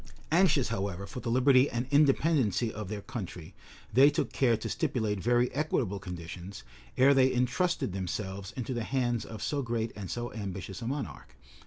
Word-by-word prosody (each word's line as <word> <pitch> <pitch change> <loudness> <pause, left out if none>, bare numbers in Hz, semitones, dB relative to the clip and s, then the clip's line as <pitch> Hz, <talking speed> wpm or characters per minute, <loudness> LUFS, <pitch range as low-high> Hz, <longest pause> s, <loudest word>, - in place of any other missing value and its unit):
Anxious, 155 -7 +4
however, 100 -3 -3
for 100 +6 -7
the 120 - -4
liberty 130 +2 +5
and 120 +1 -2
independency 140 - +3
of 105 -3 -6
their 105 -2 -5
country, 90 -7 -7 0.4
they 135 +5 +7
took 145 - -1
care 120 -4 +3
to 110 - -5
stipulate 115 -10 -1
very 120 +4 +2
equitable 125 -8 -1
conditions, 90 -2 -8 0.3
ere 135 +2 +6
they 130 -1 +4
intrusted 125 - 0
themselves 95 +1 -4
into 130 +1 -3
the 120 -2 -2
hands 120 -2 -1
of 110 -2 -7
so 145 -1 -1
great 115 -2 -2
and 100 -4 -6
so 120 0 -4
ambitious 95 0 -6
a 115 - -4
monarch. 135 - -5
120 Hz, 170 wpm, -30 LUFS, 100-130 Hz, 0.4 s, they